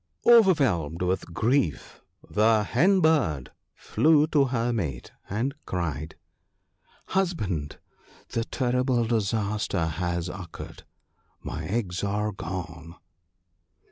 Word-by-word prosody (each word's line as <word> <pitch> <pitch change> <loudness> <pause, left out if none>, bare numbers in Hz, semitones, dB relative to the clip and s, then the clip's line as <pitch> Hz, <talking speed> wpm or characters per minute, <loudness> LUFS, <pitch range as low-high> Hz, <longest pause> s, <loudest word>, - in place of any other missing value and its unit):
Overwhelmed 135 - +4
with 90 -1 -1
grief, 115 - 0 0.3
the 110 0 +3
Hen 180 - +3
bird 125 - +2 0.2
flew 155 -1 +3
to 145 -4 +4
her 120 -2 0
mate, 75 - -3 0.2
and 115 +7 -1
cried: 80 -4 -3 0.3
— - - -50
" - - -44 0.2
Husband, 105 - -1 0.5
the 115 - -1
terrible 125 0 0
disaster 105 -5 0
has 85 +1 -2
occurred! 90 -2 -9 0.6
My - - -5
eggs 95 -4 -2
are 105 +1 -1
gone 85 -3 -7
105 Hz, 105 wpm, -26 LUFS, 85-130 Hz, 0.6 s, Overwhelmed